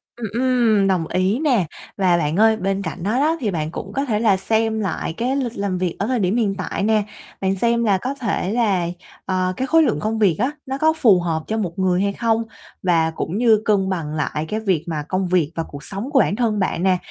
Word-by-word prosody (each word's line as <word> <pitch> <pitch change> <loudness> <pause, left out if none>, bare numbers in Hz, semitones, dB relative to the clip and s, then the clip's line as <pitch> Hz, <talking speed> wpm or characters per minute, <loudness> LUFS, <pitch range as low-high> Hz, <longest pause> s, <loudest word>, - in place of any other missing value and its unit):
Ừm, 235 -2 -5
ừm, 235 -4 +2
đồng 180 -4 +1
ý 190 +7 0
nè. 250 - +2 0.3
Và 185 -3 +3
bạn 150 -1 -1
ơi, 220 0 +5
bên 195 0 -1
cạnh 185 -2 -5
đó 215 +6 0
đó 315 +4 +2
thì 220 -6 -1
bạn 155 -3 -3
cũng - - -7
có 275 +1 -1
thể 215 -6 0
là 210 -4 +3
xem 220 +2 0
lại 185 -4 -2
cái 250 +7 -1
lịch 250 -4 -2
làm 200 -2 -1
việc 180 -2 -2
ở 205 - -1
thời 255 -2 0
điểm 190 +1 +1
hiện 205 -5 +1
tại 185 +1 -3
nè, 215 0 +2 0.4
bạn 190 0 +1
xem 235 +4 +1
là 200 -4 +3
có 255 +8 -3
thể 225 -7 -2
là, 200 -7 +1 0.4
ờ, 185 -1 0
cái 260 - -1
khối 325 +3 +5
lượng - - +1
công 220 +1 -2
việc 195 -6 +4
á, 255 +5 +1
nó 265 0 -3
có 315 +2 +3
phù 220 - +4
hợp 165 -2 -2
cho 220 - -1
một 185 -4 -3
người 185 -1 +2
hay 200 0 0
không, 230 +1 0 0.4
và 165 -3 +2
cũng 170 +5 -3
như 225 -2 +4
cân 195 -3 +2
bằng 165 -5 -3
lại 150 0 -2
cái 215 - -1
việc 190 -8 0
mà 155 -3 -3
công 185 0 -1
việc 175 -4 +1
và 165 - -1
cuộc 145 0 -10
sống 205 - -5
của 275 - +4
bản 200 - +2
thân 215 -3 0
bạn 185 -2 -1
nè. 190 -1 +3
200 Hz, 250 wpm, -21 LUFS, 185-230 Hz, 0.4 s, ơi